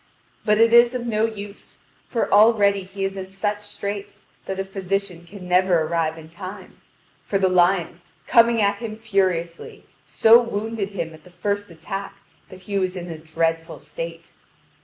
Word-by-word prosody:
But 210 0 +3
it 230 +1 +4
is 235 +1 +6
of 245 -1 -3
no 220 -1 +1
use, 205 -2 -8 0.3
for 235 - -1
already 205 -2 +5
he 195 +1 -5
is 195 0 -3
in 190 -1 -6
such 205 +2 -2
straits 205 -1 -6 0.2
that 190 - -3
a - - 0
physician 195 -2 -3
can 190 -1 -10
never 180 -1 +3
arrive 160 0 -1
in 160 -1 -11
time; 185 +3 -10 0.4
for 200 - -1
the 190 -1 +2
lion, 180 -1 +2 0.2
coming 235 -1 +5
at 200 0 +2
him 220 -1 -6
furiously, 190 -6 -2 0.2
so 230 +2 +6
wounded 220 -2 -3
him 170 -5 -5
at 155 -1 -15
the - - -16
first 200 +3 -3
attack, 195 +4 -6 0.3
that 185 0 -13
he 200 +1 -1
was 185 0 -1
in 175 -1 -6
a 160 - -7
dreadful 165 +1 -2
state. - - -8
195 Hz, 170 wpm, -22 LUFS, 180-210 Hz, 0.4 s, is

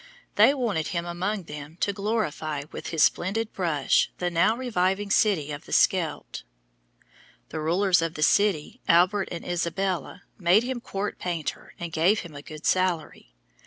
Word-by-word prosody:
They 280 - +5
wanted 215 - -1
him 170 -1 -2
among 185 +4 -2
them 150 0 -9
to 200 - +1
glorify 190 -8 -2
with - - -7
his 160 -2 +2
splendid 215 +5 0
brush 160 -7 +1
the 180 0 -2
now 175 +7 +3
reviving 200 -5 0
city 185 -10 +2
of 145 +2 -7
the - - -13
Scheldt. 175 -5 +1 1.1
The 160 - -5
rulers 175 +3 +2
of 165 0 -2
the 155 - -1
city, 190 0 +2
Albert 185 +4 +3
and 170 - -6
Isabella, 175 -1 -2 0.2
made 185 +5 +4
him 250 -1 -3
court 200 -2 -4
painter 170 -4 -4
and 170 -1 -5
gave 175 +7 +2
him 170 -3 -10
a 140 - -7
good 155 +1 -10
salary. 170 - -1
175 Hz, 160 wpm, -26 LUFS, 160-200 Hz, 1.1 s, They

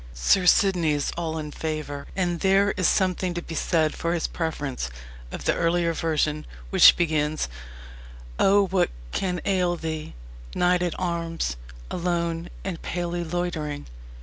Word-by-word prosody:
Sir 180 - +3
Sidney 180 -5 +4
is 145 -1 -1
all 160 -2 -3
in 150 -1 -5
favour 150 -2 -4
and 175 -3 0
there 195 +1 +4
is 185 -3 +1
something 185 -1 +1
to 175 - -2
be 165 - -7
said 160 -1 +1
for 170 +1 -1
his 165 - -1
preference 145 - -3 0.4
of - - -6
the - - +3
earlier 170 0 +1
version, 155 -2 0 0.2
which - - +8
begins: 155 -2 0 0.9
O 200 +1 +5
what 185 -1 +1 0.2
can 180 -2 -1
ail 180 -3 +2
thee, 160 - -5 0.4
knight 180 0 +3
at 175 -2 -1
arms, 165 - -2 0.4
Alone 170 -1 -1
and 185 -4 -4
palely 175 0 -3
loitering! 160 -4 -3
170 Hz, 145 wpm, -25 LUFS, 155-180 Hz, 0.9 s, which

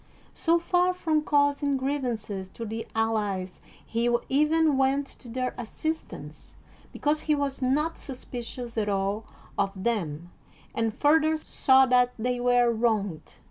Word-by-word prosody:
So 335 +1 +2
far 360 +1 +2
from 315 -4 +1
causing 285 -1 +2
griev 275 +2 -1
ances 215 -6 -4
to 230 - -6
the 225 +1 -5
allies 205 -5 -1 0.2
he 235 +1 0 0.2
even 305 +2 +3
went 270 +1 +2
to 255 -2 -13
their 255 +2 -2
assist 315 +7 -3
ance, - - -11 0.4
because 300 +1 0
he 305 - +1
was 280 -1 -2
not 300 +6 0
suspicious 245 -2 -5
at 210 -1 0
all 200 +2 -1 0.3
of 195 -1 -1
them 175 -7 -2 0.4
and 225 -1 0
further 315 +5 +3
saw 265 -3 +4
that 250 -1 +3
they 245 +2 -1
were 245 -1 +4
wronged. 215 -8 -1
250 Hz, 140 wpm, -27 LUFS, 220-290 Hz, 0.4 s, saw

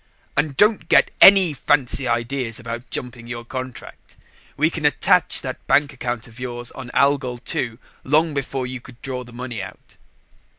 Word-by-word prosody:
"And 150 -1 0
don't 210 0 +3
get - - +5
any 190 -5 +8
fancy 135 -1 0
ideas 120 0 -2
about 120 0 -7
jumping 120 +1 -4
your 120 -1 -6
contract. 130 0 -8 0.4
We - - +2
can - - -5
attach - - +3
that - - -7
bank 145 -1 +3
account 120 -3 -4
of 115 +1 -14
yours 120 -1 -5
on 130 -2 -9
Algol 140 -3 +2 0.2
II 115 -2 -2 0.3
long 155 +3 +2
before 135 -2 -3
you 125 -1 -6
could 125 -1 -15
draw 130 -2 -4
the 125 - -14
money 120 -3 -6
out." - - -12
125 Hz, 165 wpm, -21 LUFS, 120-140 Hz, 0.4 s, any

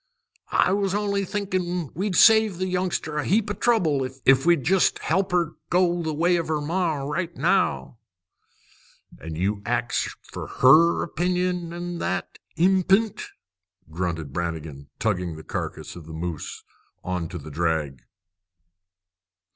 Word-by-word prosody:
"I - - +3
was 200 -1 0
only 200 -1 0
thinkin' 180 -5 -2
we'd 195 +1 -2
save 220 -2 +6
the 185 - -1
youngster 180 -4 -2
a - - -1
heap 210 +2 +1
of - - -6
trouble 165 - +2 0.2
if 135 +3 +5
we'd 170 -6 +4
jest 190 +5 +3
help 195 0 0
her 170 -3 +1 0.2
go 175 -1 +2
the 160 -1 -2
way 170 +4 +2
of 165 - -2
her 155 -1 0
ma 165 +2 0
right 170 +5 -3
now." 65 - +1 1.2
"You 90 +6 -2
ax 120 +2 0
her - - -6
fer - - -8
her 155 +6 +5
opinion 180 +1 -1
on 175 0 -5
that - - -3 0.2
p'int!" 190 +4 +2 0.6
grunted 80 -4 -3
Brannigan, 80 -4 -5
tugging 90 -6 -1
the 80 - -10
carcass - - -5
of 85 -3 -11
the 80 - -8
moose 80 -1 -5 0.4
on 90 -2 -2
to 85 - -7
the 75 -1 -9
drag. 75 -4 -1
165 Hz, 140 wpm, -24 LUFS, -, 1.2 s, save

